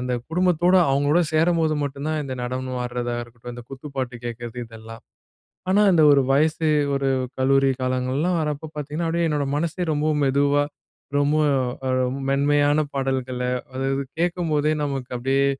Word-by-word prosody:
அந்த 125 0 -2 0.2
குடும்பத்தோட 180 +1 +2 0.2
அவங்களோடு 145 +5 +3
சேரம்போது 160 -1 +2
மட்டும்தான் 145 +3 -3
இந்த 130 - -5
நடனம் 130 0 -3
ஆடுறதா 120 0 -3
இருக்கட்டும், 120 +1 -10
இந்த 120 - -9
குத்து 135 +2 -9
பாட்டு 130 -2 -3
கேட்கிறது 120 0 -6
இதெல்லாம். 115 0 -11 0.7
ஆனா 205 +2 +4
அந்த 160 -2 +5
ஒரு 140 - +5
வயசு, 155 +3 +2 0.3
ஒரு 135 0 0 0.3
கல்லூரி 135 +1 +3
காலங்கள்லாம் 130 +7 0
வர்றப்போ 150 0 -3
பார்த்தீங்கன்னா, 150 +3 -3
அப்டியே 170 0 +1
என்னோட 150 -2 0
மனசே 170 +3 -2
ரொம்பவும் 150 0 +1
மெதுவா 140 +1 +3 0.6
ரொம்ப 145 +2 +2 0.5
மெ 130 - 0 0.4
மென்மையான 145 +2 +3
பாடல்கள, 130 -2 -2 0.3
அதாவது 135 +1 -1 0.2
கேட்கும்போதே 165 -4 +1
நமக்கு 135 -3 -3
அப்டியே 135 +3 +1
140 Hz, 140 wpm, -23 LUFS, 130-155 Hz, 0.7 s, அந்த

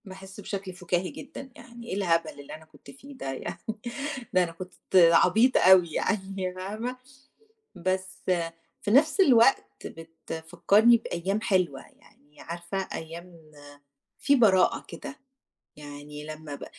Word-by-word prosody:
باحِسّ 190 +1 -11
بشكل 195 -2 -6
فُكاهي 180 0 -2
جدًا 275 - -10
يعني، 235 -1 -13
إيه 190 - -3
الهبل 170 -4 +1
اللي 140 - -9
أنا 160 0 -14
كنت 155 - -16
فيه 275 +2 -14
ده 135 - -4
يعني؟ 130 - -6 0.8
ده 185 0 +4
أنا 170 - -4
كنت 180 +2 -10 0.2
عبيطة 180 +8 +5
أوي 180 -3 +6
يعني 190 -2 -2
فاهمة، 215 +7 -5 0.8
بس 185 +1 -3 0.6
في - - -2
نفْس 300 - +4
الوقت 265 -6 +3
بتفكّرني 165 +7 +1
بأيام 195 -2 -3
حلوة، 185 - 0
يعني 145 +1 -22
عارفة 170 +3 -6 0.2
أيام 165 -1 -9 0.7
فيه 280 0 +3
براءة 200 -7 +3
كده، 275 - -8 0.6
يعني 145 0 -10
لمّا 155 -1 -8
ب - - -8
185 Hz, 130 wpm, -27 LUFS, 165-210 Hz, 0.8 s, أوي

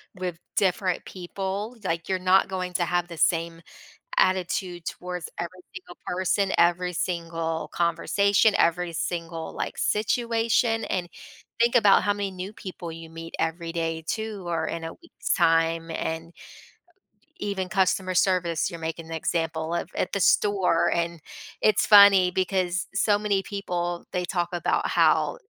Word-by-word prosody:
with 180 -2 -4 0.2
different 185 -1 +1
people. 195 +5 -5
Like 170 -2 -2
you're 190 - +1
not 185 +1 +4
going 185 -1 -3
to 175 - +1
have 175 0 0
the 170 -1 -9
same 165 0 +1 0.6
attitude 180 -1 0
towards 180 -1 -5
every 175 +2 -5
single 185 -2 -10
person, 190 +2 0
every 175 +1 +3
single 165 -2 -3
conversation, 200 +5 +2
every 170 0 +2
single, 165 0 -4
like, - - -3
situation, 225 +1 +1
and 175 -2 -2 0.5
think 235 +1 +3
about 205 -4 +6
how 205 - +2
many 205 -1 -3
new 190 +2 -7
people 180 -4 -8
you 165 0 -9
meet 165 0 -9
every 165 +1 -2
day 165 -1 -2
too 220 -3 -3
or 165 -2 -1
in 165 - -4
a 165 - -5
week's 340 - -3
time 165 -1 +2
and 165 +1 -4 1.1
even 195 -3 -3
customer 190 -2 +1
service, 180 -3 +1
you're 170 -3 -8
making 165 0 -5
an 165 - -7
example 160 0 -2
of 170 - -2
at - - -1
the 200 - 0
store, 190 -3 +3
and 170 0 -1 0.4
it's 215 -2 +3
funny 200 -3 +8
because 185 -1 0
so 205 +1 +3
many 205 -2 0
people, 175 -3 -3
they 180 -1 -1
talk 175 -1 -1
about 175 - 0
how - - +3
180 Hz, 150 wpm, -25 LUFS, 170-195 Hz, 1.1 s, funny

